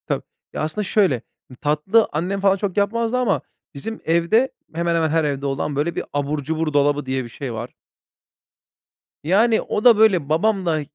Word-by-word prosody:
Tabii. - - -2 0.3
Ya, - - -3
aslında 155 +7 -2
şöyle, 195 -6 +2 0.3
m 130 - -12
tatlı 155 +9 +2
annem 180 +6 -2
falan 195 0 +3
çok 200 -1 -3
yapmazdı 230 +4 +1
ama 240 -6 +1 0.3
bizim 225 +11 -6
evde, 170 +10 +2 0.2
hemen 170 0 0
hemen 160 -1 +1
her 160 +1 +2
evde 140 -2 -2
olan, 140 +1 -2
böyle, 150 +4 -1
bir - - -2
"abur 145 +1 -1
cubur 160 +1 -2
dolabı" 145 0 +2
diye 130 0 -2
bir 120 - -9
şey 125 +1 -6
var. 110 - -6 1.5
Yani, 220 +8 +3
o 210 - -3
da, 235 -3 +8
böyle, 190 -9 +3
babam 190 +4 +1
da 160 -2 +1
165 Hz, 180 wpm, -21 LUFS, 145-205 Hz, 1.5 s, da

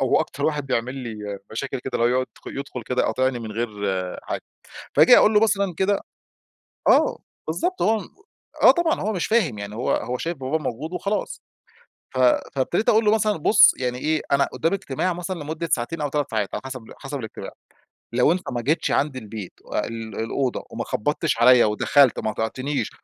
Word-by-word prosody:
هو - - +3
أكتر - - -4
واحد 150 -3 0
بيعمل 125 0 -1
لي 105 -6 -6
مشاكل 135 +3 -3
كده، 130 - -6
اللي 120 +1 +3
هو - - +3
يد 130 - -3 0.3
يدخل 130 -3 -6
كده 125 +3 0
يقاطعني 130 -1 0
من 110 -2 -6
غير 120 +2 -2 0.5
حاجة. - - -4 0.5
فآجي - - +8
أقول 215 - +5
له 210 - +6
مثلًا 200 -4 +1
كده 195 +1 +2 0.9
آه، - - +4 0.3
بالضبط 365 +2 -2
هو 220 +1 +3
م - - -10 0.5
آه - - +10
طبعًا، 345 -2 0
هو 215 +2 -1
مش 180 - -1
فاهم، 180 - +2
يعني 100 +1 -6
هو 120 - -1
هو 125 +1 -1
شايف 170 +2 -3
باباه 135 +4 -1
موجود 155 +3 -5
وخلاص. 200 +3 -3 0.7
ف - - -5 0.4
فابتديت 170 - +1
أقول 220 0 +4
له 210 - +5
مثلًا: 215 -3 +1
"بُص 160 - +6
يعني 125 -1 -2
إيه، 155 +4 0
أنا 140 0 +4
قدامي 165 +9 -1
اجتماع 180 0 -2
مثلًا 180 +1 -5
لمدة 160 +2 -4
ساعتين 150 +6 -1
أو 145 - -1
3 145 -3 -2
ساعات، 105 -3 -1
على - - -3
حسب 130 -3 -6 0.2
حسب 140 0 -5
الاجتماع، 110 -3 -7 0.6
لو 125 +6 +4
أنت 180 +1 0
ما 120 - -2
جيتش 150 +8 0
عندي 135 -3 0
البيت 105 -3 -8 0.3
ال 115 -2 -7
الأوضة 125 +3 -1
وما - - -4
خبطتش 145 +2 -1
عليَّ 125 0 +7
ودخلت 125 +5 +3
وما 110 - -2
اقطعتنيش 130 +7 -2
135 Hz, 190 wpm, -23 LUFS, 120-170 Hz, 0.9 s, آه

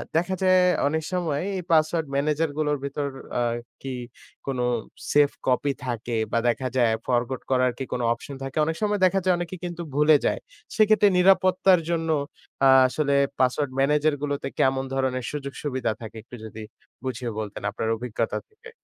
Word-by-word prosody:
দেখা 175 +3 +1
যায় 185 0 +5 0.3
অনেক 160 +2 -1
সময় 165 -6 -1 0.2
এই 180 - -4
পাসওয়ার্ড 160 0 +3
ম্যানেজারগুলোর 150 +1 0
ভেতর 140 +1 -2 0.3
আ - - +1 0.4
কি 135 -1 -5 0.5
কোন 135 -2 -2 0.5
সেফ 145 -1 +5 0.2
কপি 130 +2 +2
থাকে 120 -1 -3 0.2
বা 115 - +2
দেখা 130 +2 -1
যায় 120 -3 +4
ফরগট 125 +1 0
করার 130 -1 +3
কি - - -3
কোনো 125 - -1
অপশন 140 +3 -9
থাকে? 135 +1 -6
অনেক 160 +1 -1
সময় 210 -1 +1
দেখা 195 +1 +3
যায় 185 -1 +4
অনেকে 175 +1 -4
কিন্তু 175 -1 -5
ভুলে 150 +1 +6
যায়। - - +1 0.4
সেক্ষেত্রে 215 -1 +5
নিরাপত্তার 185 0 +5
জন্য 165 -1 -1 0.6
আ - - +8 0.2
আসলে 140 +2 0 0.2
পাসওয়ার্ড 130 +2 +1
ম্যানেজারগুলোতে 145 0 +1
কেমন 130 0 +2
ধরনের 130 -1 -1
সুযোগ-সুবিধা 140 -3 -3
থাকে? 110 0 -8
একটু 125 - -11
যদি 110 0 -9 0.4
বুঝিয়ে 125 -2 -3
বলতেন 105 -2 -5
আপনার 110 - -3
অভিজ্ঞতা 115 -1 -2
থেকে। 450 +1 -15
145 Hz, 155 wpm, -25 LUFS, 130-165 Hz, 0.6 s, আ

